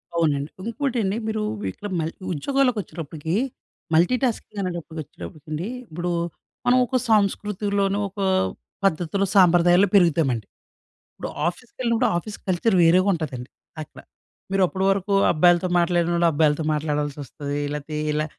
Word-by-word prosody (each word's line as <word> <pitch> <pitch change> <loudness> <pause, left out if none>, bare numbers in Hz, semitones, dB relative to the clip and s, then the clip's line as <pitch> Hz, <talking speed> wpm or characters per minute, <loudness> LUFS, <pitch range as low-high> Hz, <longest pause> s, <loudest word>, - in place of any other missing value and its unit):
అవునండి. 150 -3 +1
ఇంకోటండి 230 -3 -1
మీరు 220 -1 -1 0.2
వి 100 - -3
ఇక్కడ 205 - -7
మల్ 160 +1 -2 0.2
ఉద్యోగాలకొచ్చేటప్పటికి, 170 - -1 0.6
మల్టీటాస్కింగ్ 220 +4 +1
అనేటప్పటికొచ్చేటప్పటికండి, 155 - -6 0.2
ఇప్పుడు 175 +2 -3 0.5
మనం 245 +1 +5
ఒకో 255 - 0
సంస్కృతిలోను, 200 -1 +1
ఒక 200 - -12 0.7
పద్ధతిలో 180 +2 +1
సాంప్రదాయాల్లో 180 +1 +5
పెరుగుతామండి. 155 - +3 0.7
ఇప్పుడు - - -6 0.2
ఆఫీస్‌కెళ్ళినప్పుడు, 235 +5 -1
ఆఫీస్ 205 +4 -6
కల్చర్ 190 +3 +2
వేరేగుంటదండి. 165 -7 +2 0.3
అక్కడ. 155 - -11 0.5
మీరు 195 -1 +3
అప్పడు 190 +1 -2
వరకు 195 +1 -1 0.2
అబ్బాయిలతో 175 +2 +4
మాట్లాడినోళ్ళు, 170 0 +2
అబ్బాయిలతో 150 0 +2
మాట్లాడాల్సొస్తది. 145 -1 -3
లేతే 150 +1 -5 0.2
ఇలా 150 0 0
175 Hz, 105 wpm, -23 LUFS, 155-200 Hz, 0.7 s, మనం